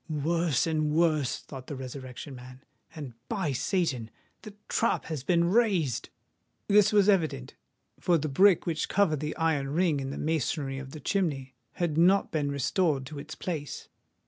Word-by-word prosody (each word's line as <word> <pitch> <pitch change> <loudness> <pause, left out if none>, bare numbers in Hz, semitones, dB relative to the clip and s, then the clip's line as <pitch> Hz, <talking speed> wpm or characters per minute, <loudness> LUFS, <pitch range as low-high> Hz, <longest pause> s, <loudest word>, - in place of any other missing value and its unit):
"Worse 160 -1 +1
and 155 -2 0
worse!" 155 -4 +2
thought 130 -2 -10
the 145 - -5
Resurrection 130 +1 -8
Man. 130 +1 -12 0.3
"And, 145 -6 -7 0.2
by 185 -7 -1
Satan! 135 - -1 0.3
the 215 -2 -11
trap 230 - +1
has 155 -5 -4
been 170 +1 +2
raised!" 190 - +1 0.6
This 210 +1 +5
was 205 -2 +4
evident; 165 - +1 0.5
for 175 -2 +3
the 155 0 -2
brick 185 +6 +4
which 165 -2 -2
covered 180 -7 +2
the 150 +1 -4
iron 160 -4 +1
ring 160 -1 +1
in 135 0 -4
the 140 - -5
masonry 150 -3 -1
of 135 0 -8
the 155 - -9
chimney, 140 -5 -1 0.2
had 165 -3 -1
not 190 +4 +4
been 150 -3 0
restored 140 0 0
to 145 +2 -7
its 155 +2 -8
place. 155 -6 -5
155 Hz, 165 wpm, -28 LUFS, 135-175 Hz, 0.6 s, This